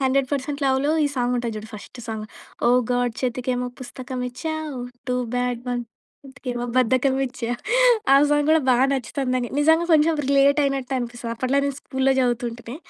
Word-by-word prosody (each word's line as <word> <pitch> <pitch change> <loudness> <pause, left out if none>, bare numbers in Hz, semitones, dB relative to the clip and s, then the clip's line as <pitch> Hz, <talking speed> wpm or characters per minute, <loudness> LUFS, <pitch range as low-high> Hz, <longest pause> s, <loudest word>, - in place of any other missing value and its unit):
'Hundred 265 0 +1
percent 285 +1 -2
లవ్‌'లో 270 +2 +2
ఈ - - +3
సాంగుంటది 245 -2 -1
చూడు 215 +1 -7
ఫస్ట్ 215 +3 -10
సాంగ్. 220 -1 -4 0.4
ఓ - - +5 0.2
గాడ్ 245 -1 +1
చేతికేమో 250 0 -1
పుస్తకమిచ్చావు, 260 +4 -5 0.3
టూ 250 - +1 0.2
బ్యాడ్ 245 -1 -1
ఒంటికేమో 245 +1 -7
బద్ధకమిచ్చా. 255 0 +1 0.6
ఆ - - +8 0.2
సాంగ్ 295 0 +2
గూడా 320 0 +5
బా 250 - +5 0.2
నచ్చుతది 265 0 -2
నాకు. 245 -2 -1
నిజంగా 320 +3 +4
కొంచెం 320 +1 +4
రిలేటయినట్టనిపిస్తది. 275 -4 +1
అప్పట్లో 255 +4 0
నేను 280 -1 -2
స్కూల్‌లో 265 0 +1
చదువుతుంటిని. 240 0 -2
255 Hz, 135 wpm, -23 LUFS, 245-275 Hz, 0.6 s, ఆ